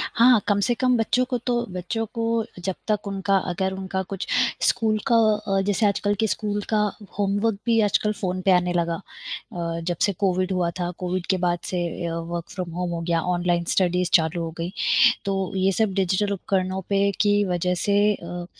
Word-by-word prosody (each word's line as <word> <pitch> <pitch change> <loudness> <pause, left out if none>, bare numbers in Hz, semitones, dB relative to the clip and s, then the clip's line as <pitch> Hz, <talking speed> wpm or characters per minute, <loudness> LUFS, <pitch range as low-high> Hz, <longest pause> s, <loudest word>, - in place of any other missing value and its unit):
हाँ, 240 0 +6
कम 205 -1 +2
से 240 - +2
कम 250 +1 +2
बच्चों 235 +3 +2
को 250 - 0
तो 245 - +2 0.2
बच्चों 185 +5 -3
को 230 -1 0 0.2
जब 190 0 -1
तक 210 -1 0
उनका 195 0 +1
अगर 190 +2 -1
उनका 190 0 -3
कुछ 195 -2 -4 0.4
स्कूल 220 -2 +2
का 235 - +4
अ, 210 -3 +2
जैसे 205 +2 +1
आजकल 205 0 +1
के 220 - +2
स्कूल 210 0 -2
का 220 - +2 0.4
होमवर्क 205 +1 +1
भी 230 -1 +3
आजकल 210 0 +2
फ़ोन 185 -1 -1
पे 190 - +3
आने 180 -1 +3
लगा 170 -1 0 0.6
अ, 170 -2 -3
जब 175 0 -2
से 200 - 0
कोविड 185 -1 +1
हुआ 180 -2 +1
था। 175 -1 -1
कोविड 180 0 -2
के 190 - +3
बाद 175 -1 0
से 180 - -1 0.3
अ, 165 - -3
वर्क 170 0 -5
फ्रॉम 180 -3 -5
होम 180 +1 -3
हो 170 -1 -3
गया, 165 0 0
ऑनलाइन 175 0 0
स्टडीज़ 180 -1 +1
चालू 165 +1 +3
हो 165 - -4
गईं। 170 +2 -3 0.5
तो 195 -2 -1
ये 190 +1 +2
सब 210 0 +1
डिजिटल 195 +2 +1
उपकरणों 190 -1 -1
पे 200 0 +3
की 205 0 +3
वजह 180 -1 0
से 200 0 +3 0.2
अ, 175 0 -7
190 Hz, 195 wpm, -24 LUFS, 175-205 Hz, 0.6 s, हाँ